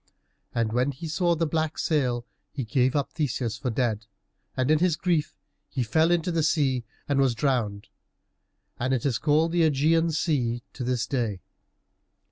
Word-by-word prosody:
And 115 -2 0
when 125 +4 +2
he 160 +6 -7
saw 175 +1 +1
the 165 +1 0
black 160 0 -1
sail 125 -6 0 0.3
he 140 - -4
gave 130 +2 +1
up 140 -2 0
Theseus 125 -7 -2
for 130 - -2
dead, 115 -3 -1 0.5
and 130 +3 +2
in 155 - +4
his 175 -2 +3
grief 165 -3 0 0.3
he 130 - -1
fell 160 +9 +2
into 175 0 +1
the 165 -1 +1
sea 140 -6 +1 0.2
and 140 -1 +1
was 130 -3 +3
drowned, 115 -6 -1 0.9
and 130 +2 +1
it 125 - -3
is 130 -5 +1
called 155 +2 +2
the 175 0 +2
Ægean 160 +2 +3
Sea 125 -7 0
to 130 - -5
this 125 -1 0
day. 115 -8 -2
140 Hz, 170 wpm, -26 LUFS, 120-160 Hz, 0.9 s, in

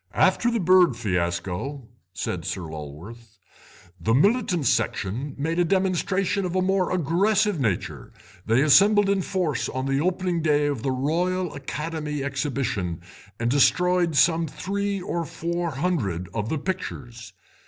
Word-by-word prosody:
"After 240 - +3
the 235 -1 0
bird 180 - +5
fiasco," 95 +6 -2 0.2
said 90 - -4
Sir - - -3
Lulworth, 85 +9 -9 0.6
"the 110 +8 +1
militant 185 - +2
section 115 +4 -1
made 165 +4 -1
a - - +5
demonstration 190 +2 0
of 180 0 -3
a 185 - +2
more 190 -1 +1
aggressive 190 +3 +1
nature; 105 -9 -2 0.3
they 115 +6 +2
assembled 200 +7 +5
in 195 -1 +1
force 180 -8 -1
on 130 0 -3
the 135 +1 0
opening 180 0 0
day 150 -2 +2
of 145 -5 -1
the 135 - -1
Royal 170 +7 -1
Academy 150 0 -4
Exhibition 135 - -2 0.4
and 115 +1 0
destroyed 175 +4 +3
some 165 +2 +3
three 200 +6 -3
or 175 -2 -3
four 170 +3 -3
hundred 130 - -2
of 110 0 -2
the 160 - -1
pictures. 120 - -6
150 Hz, 140 wpm, -24 LUFS, 120-180 Hz, 0.6 s, bird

